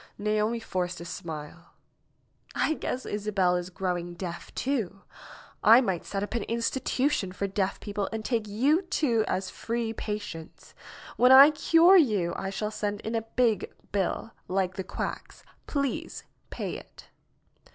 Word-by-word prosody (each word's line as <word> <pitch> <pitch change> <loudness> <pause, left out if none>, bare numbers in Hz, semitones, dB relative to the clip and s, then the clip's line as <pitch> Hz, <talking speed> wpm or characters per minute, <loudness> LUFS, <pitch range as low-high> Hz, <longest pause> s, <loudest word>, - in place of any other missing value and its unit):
Naomi 215 +2 0
forced 180 -5 -3
a 170 - -8
smile. 165 -1 -8 0.8
"I - - +2
guess 260 -4 -4
Isabel 200 -3 +1
is 180 0 -3
growing 175 -2 -3
deaf, 175 -1 -6
too. 220 -8 -2 0.6
I 225 +3 +9
might 190 -9 -1
set 195 0 -3
up 205 - -5
an 235 - 0
institution 235 -1 0
for 200 +2 -3
deaf 195 0 -1
people 205 -1 -3
and 220 -1 -4
take 225 -4 0
you 270 - +2
two 290 - +1
as 185 0 -2
free 230 -1 -3
patients. 210 -7 -6 0.4
When 250 +1 +6
I 275 +3 +10
cure 330 +5 +6
you 205 - +2
I 195 - -3
shall 210 +2 -3
send 205 -1 -3
in 220 - -4
a 225 - +1
big 225 -6 +2 0.2
bill, 200 +3 -1 0.2
like 185 0 0
the 190 - -4
quacks. - - -6 0.2
Please 280 -3 -2 0.3
pay - - -4
it." - - -17
210 Hz, 150 wpm, -28 LUFS, 185-235 Hz, 0.8 s, I